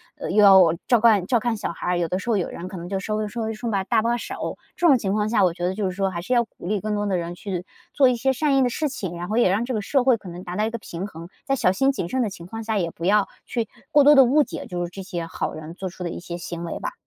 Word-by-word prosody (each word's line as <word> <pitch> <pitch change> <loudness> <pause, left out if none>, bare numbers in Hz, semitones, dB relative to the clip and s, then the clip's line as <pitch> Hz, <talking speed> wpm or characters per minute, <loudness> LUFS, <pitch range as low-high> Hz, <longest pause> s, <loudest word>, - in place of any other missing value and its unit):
呃， 290 - -6
又 210 +2 +4
要， 190 -4 +7
照 240 -3 +4
看 215 -5 +4
照 240 +3 +2
看 225 0 -1
小 205 - -3
孩， 175 +1 -2
有 170 -1 0
的 185 +3 -2
时 235 - -6
候 215 - +3
有 180 - -1
人 180 - -7
可 185 -1 -7
能 170 +1 -7
就 195 0 -2
稍 215 +2 -3
微 215 0 -1
稍 230 +2 -5
微 220 0 -2
顺 230 +1 -4
把 195 -1 0
搭 220 +2 +1
把 235 +1 +1
手。 240 - -5 0.2
这 350 - -1
种 265 -5 +6
情 195 -3 -2
况 210 0 +1
下 220 -3 +2
我 175 -2 +3
觉 175 0 -4
得 185 - 0
就 205 0 -2
是 - - -3
说， 195 -1 0
还 170 -1 -4
是 250 - -2
要 235 - +4
鼓 200 - -11
励 210 0 0
更 215 0 -2
多 205 0 -1
的 190 -2 +1
人 170 0 -4
去 180 0 -5 0.3
做 275 -3 +5
一 250 - +2
些 265 +3 +1
善 280 +1 +1
意 - - +4
的 250 - +3
事 300 +5 -1
情， 190 -10 -5
然 175 +1 -5
后 220 - -1
也 235 - +4
让 210 +5 +1
这 255 - -3
个 215 - -1
社 260 +5 +1
会 250 -3 +4
可 190 -4 -11
能 175 +2 -8
达 180 -1 -6
到 210 +2 +1
一 - - -1
个 235 - -4
平 190 -2 -6
衡， 165 -2 -10 0.2
在 275 - 0
小 185 -8 +3
心 270 +8 +2
谨 175 - -4
慎 260 +7 -1
的 220 - 0
情 170 -3 -10
况 225 +4 -7
下 220 -1 -1
也 170 -3 -1
不 170 - -7
要 205 +1 +3 0.2
去 230 -2 -3 0.2
过 290 - +5
多 295 +1 +8
地 270 -2 +8
误 285 +5 +4
解 - - -7
就 175 -1 -3
是 - - -7
这 195 - -8
些 180 -3 -5
好 165 - -4
人 155 +1 -8
做 190 +1 -5
出 180 +1 -9
的 170 - -3
一 - - -6
些 175 0 -6
行 170 -1 -6
为 170 - -4
吧。 - - -4
205 Hz, 365 characters per minute, -23 LUFS, 180-235 Hz, 0.3 s, 多